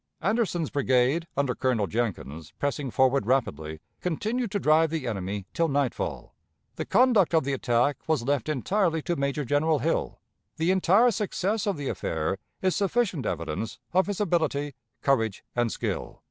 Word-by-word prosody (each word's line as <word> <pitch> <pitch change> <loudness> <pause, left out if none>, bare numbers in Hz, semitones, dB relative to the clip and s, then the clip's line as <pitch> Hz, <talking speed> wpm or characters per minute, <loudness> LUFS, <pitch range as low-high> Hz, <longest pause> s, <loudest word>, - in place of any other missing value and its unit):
Anderson's 185 - 0
brigade, 135 +4 +2
under 140 -3 +1
Colonel 120 -5 +1
Jenkins, 85 - -3
pressing 145 -1 -2
forward 130 -2 +2
rapidly, 80 - -1 0.2
continued 220 +8 -1
to 205 - -1
drive 160 -1 +4
the 155 -4 -3
enemy 100 -3 -3
till 165 - +2
nightfall.... 140 -3 -2 0.4
The - - -4
conduct 230 -9 +4
of 160 - +4
the 140 +1 -1
attack 125 +1 +1
was 155 -6 +1
left 140 0 0
entirely 165 - +1
to 175 - -1
Major 140 0 -1
General 150 +4 +2
Hill. 155 +5 -1 0.4
The 165 +3 +2
entire 190 +6 +4
success 210 0 -1
of 200 -5 0
the 145 -2 -4
affair 80 0 -2 0.2
is 185 -1 +2
sufficient 200 - 0
evidence 85 +6 -3 0.2
of 185 +2 +3
his 205 -2 -3
ability, 160 -7 0 0.3
courage, 115 -7 +1
and 120 -2 +1
skill." - - -4
145 Hz, 155 wpm, -27 LUFS, 120-180 Hz, 0.4 s, drive